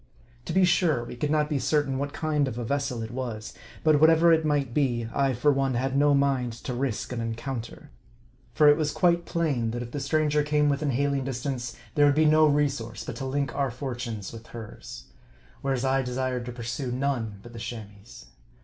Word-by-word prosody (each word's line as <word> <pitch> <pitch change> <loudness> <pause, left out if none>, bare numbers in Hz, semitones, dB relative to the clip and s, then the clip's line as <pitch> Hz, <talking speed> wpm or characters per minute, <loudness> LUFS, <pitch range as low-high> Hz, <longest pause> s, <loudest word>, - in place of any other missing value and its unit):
To - - -4
be 190 -1 +5
sure, 160 -8 +2
we - - -8
could 145 +5 -2
not 150 0 +2
be 150 -2 -1
certain 140 -2 +1
what 140 +1 -2
kind 150 -3 0
of 120 -3 -5
a 120 - -3
vessel 140 -2 -2
it 110 - -6
was; 120 -4 -5 0.3
but 155 -2 +4
whatever 165 +1 +6
it 160 0 +3
might 145 -5 0
be, 120 -5 0
I, 135 -1 +2
for 145 +5 +3
one, 135 -2 0
had 135 +2 -1
no 145 0 +4
mind 135 -4 +1
to 120 +2 -6
risk 125 -1 -2
an 120 - -3
encounter; 115 +1 -5 0.6
for 150 +5 +4
it 145 0 +7
was 150 -2 0
quite 170 +1 +2
plain, 145 -9 0
that 120 +2 -3
if 120 - -9
the 145 - -3
stranger 150 +2 +1
came 150 0 +2
within 145 +1 0
hailing 140 +1 0
distance, 125 -2 -4 0.2
there 145 -1 +5
would 140 - +3
be 155 +1 +4
no 155 0 +6
resource 140 -6 0
but 120 - -6
to 135 - -4
link 140 0 -1
our 140 -1 0
fortunes 120 -5 -5
with 115 0 -10
hers; 115 -3 -9 0.6
whereas 135 -2 -1
I 135 0 +2
desired 125 -1 -2
to - - -4
pursue 120 +2 -4
none 125 -5 -2
but 120 - -12
the 115 - -8
Cham 115 -3 -6
ois'. 120 - -14
135 Hz, 210 wpm, -26 LUFS, 120-145 Hz, 0.6 s, it